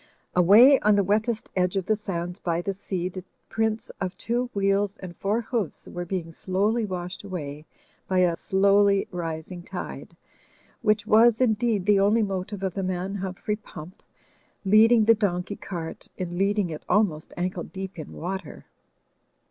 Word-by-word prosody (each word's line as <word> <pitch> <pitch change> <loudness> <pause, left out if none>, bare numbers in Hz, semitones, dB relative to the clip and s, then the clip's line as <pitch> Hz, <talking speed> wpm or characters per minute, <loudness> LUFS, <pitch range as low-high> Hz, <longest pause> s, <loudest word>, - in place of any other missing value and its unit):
Away 215 +10 +7
on 210 0 +4
the 200 - +3
wettest 215 +3 0
edge 180 0 +1
of 190 -2 -1
the 215 - +2
sands 180 -3 -4
by 170 0 -1
the 195 - -2
sea 190 -2 -3
the 185 0 -7 0.3
prints 220 0 -1
of 185 -1 -3
two 240 +1 -1
wheels 200 +1 +1
and 180 -2 -9
four 210 +6 0
hoofs 225 -6 -3
were 175 0 -5
being 170 -2 -4
slowly 205 +7 0
washed 180 0 -5
away 155 -6 -6 0.4
by 185 -1 +2
a 175 -2 +3
slowly 200 +2 +3
rising 170 0 -5
tide; - - -8 0.6
which 210 -1 +2
was, 225 +1 +5
in 250 -4 +4
deed, 215 -3 0
the 205 -1 +4
only 210 +3 +3
motive 195 0 -4
of 190 -2 -1
the 195 - -3
man 185 +1 -2
Humphrey 195 +2 -3
Pump, 180 -4 -11 0.6
leading 220 +3 +6
the 230 - +7
donkey 200 -2 -1
cart, 170 -5 -7
in 175 -1 -4
leading 195 -1 +1
it 155 - -6
almost 180 -6 +1
ankle 180 0 -2
deep 190 -2 -7
in 155 - -7
water. 190 +3 -6
195 Hz, 165 wpm, -25 LUFS, 180-210 Hz, 0.6 s, Away